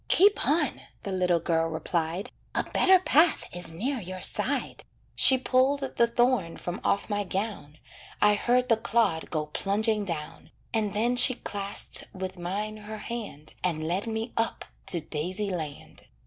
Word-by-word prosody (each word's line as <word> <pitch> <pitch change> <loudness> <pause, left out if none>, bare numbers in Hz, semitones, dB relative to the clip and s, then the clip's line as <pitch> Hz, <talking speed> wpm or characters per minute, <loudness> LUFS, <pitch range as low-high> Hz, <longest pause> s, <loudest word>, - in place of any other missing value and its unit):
"Keep 405 +3 +5
on," 300 -2 +1 0.2
the 200 - -4
little 180 -2 +1
girl 165 0 0
replied, 165 +6 -3 0.2
"A - - +3
better 380 0 +5
path 335 -2 +3
is 175 -2 +3
near 250 +11 -2
your 185 -2 -7
side." - - +1 0.3
She 260 - +7
pulled 260 +2 +2
the 235 - +4
thorn 235 -7 +1
from 175 0 -5
off 200 - 0
my 205 -1 -1
gown, 190 -6 -4 0.4
I 210 0 +5
heard 245 +4 +2
the 230 - +3
clod 220 -7 0
go 155 -2 -2
plunging 210 +7 0
down, 160 -5 -6 0.2
And 215 -3 0
then 240 +4 +1
she 245 +1 +6
clasped 200 -2 -3
with 185 -1 -6
mine 205 +5 -4
her 215 +1 -8
hand, 210 -10 -6
And 160 -3 -1
led 185 +6 -1
me 225 +1 -4
up 225 0 -1 0.2
to 170 - +2
"daisy 180 +7 -3
land." 155 -5 -7
205 Hz, 160 wpm, -27 LUFS, 175-235 Hz, 0.4 s, She